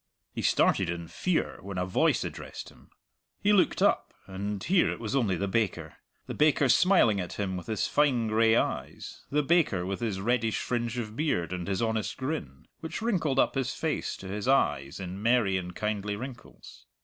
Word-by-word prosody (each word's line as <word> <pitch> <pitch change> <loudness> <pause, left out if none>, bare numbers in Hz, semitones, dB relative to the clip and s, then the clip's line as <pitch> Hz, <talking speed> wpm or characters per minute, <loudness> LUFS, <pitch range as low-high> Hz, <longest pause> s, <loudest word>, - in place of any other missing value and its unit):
He - - -4
started 95 -3 +2
in 85 -1 -4
fear 180 - -1
when 100 0 -7
a 90 - 0
voice 90 - +2
addressed - - -7
him. - - -20 0.5
He 210 - +3
looked 195 - +3
up, - - +1
and 100 +1 -4
here 185 -1 +3
it - - -4
was 115 +3 -3
only 110 -9 +2
the 100 +3 -2
baker 105 -1 -1 0.3
the - - -5
baker 150 -2 +3
smiling 150 - +4
at 90 -2 -4
him 95 -2 -3
with 90 - -7
his 110 -3 -1
fine 140 -6 +2
gray 110 +1 +4
eyes, - - -3
the 150 +1 +1
baker 140 - +2
with 95 +1 -3
his 110 -5 -2
reddish 115 +1 0
fringe 120 -1 -2
of 110 -3 -4
beard 115 - -1
and 90 -1 -4
his 100 +3 -1
honest 110 -3 -1
grin, 130 - -5
which 165 +7 -5
wrinkled 170 - 0
up - - +3
his 130 -1 -2
face 160 +1 -2
to 95 - -9
his 105 +4 -4
eyes 75 - +1
in 95 +1 -6
merry 115 -4 +3
and 90 -1 -4
kindly 105 -1 -2
wrinkles. 125 +3 -10
110 Hz, 190 wpm, -28 LUFS, 95-135 Hz, 0.5 s, smiling